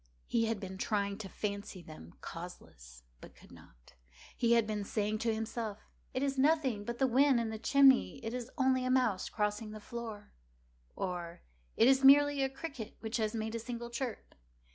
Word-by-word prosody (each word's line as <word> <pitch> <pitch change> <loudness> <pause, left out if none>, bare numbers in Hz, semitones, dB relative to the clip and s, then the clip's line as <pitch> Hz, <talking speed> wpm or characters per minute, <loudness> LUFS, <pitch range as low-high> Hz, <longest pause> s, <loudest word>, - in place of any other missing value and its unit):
He 230 -1 +1
had 225 -2 -1
been 190 -1 -7
trying 200 -1 -1
to 200 -3 -6
fancy 200 -2 -5
them 120 - -12
causeless, - - -10 0.2
but - - -13
could - - -18
not. - - -17 0.4
He 235 -1 +3
had 230 -2 +4
been 210 -1 -2
saying 210 +1 -1
to 230 +1 +1
himself—"It 225 +3 -5
is 275 -1 -1
nothing 270 -8 +2
but 235 +1 -4
the 265 - +3
wind 260 +1 +4
in 225 -1 -2
the 220 - -5
chimney—it 265 -2 +4
is 250 -1 -4
only 260 -2 +2
a 255 - -1
mouse 250 -7 +2
crossing 210 +1 -2
the 215 - -7
floor," 220 -2 -7 0.6
or 175 -2 -4 0.3
"It 230 - +6
is 270 0 +4
merely 285 +1 +7
a 270 - +1
cricket 265 -5 -7
which 220 +1 -2
has 220 0 -1
made 220 0 -3
a 230 - -2
single 235 0 -6
chirp." 240 -1 -5
225 Hz, 180 wpm, -33 LUFS, 210-260 Hz, 0.6 s, merely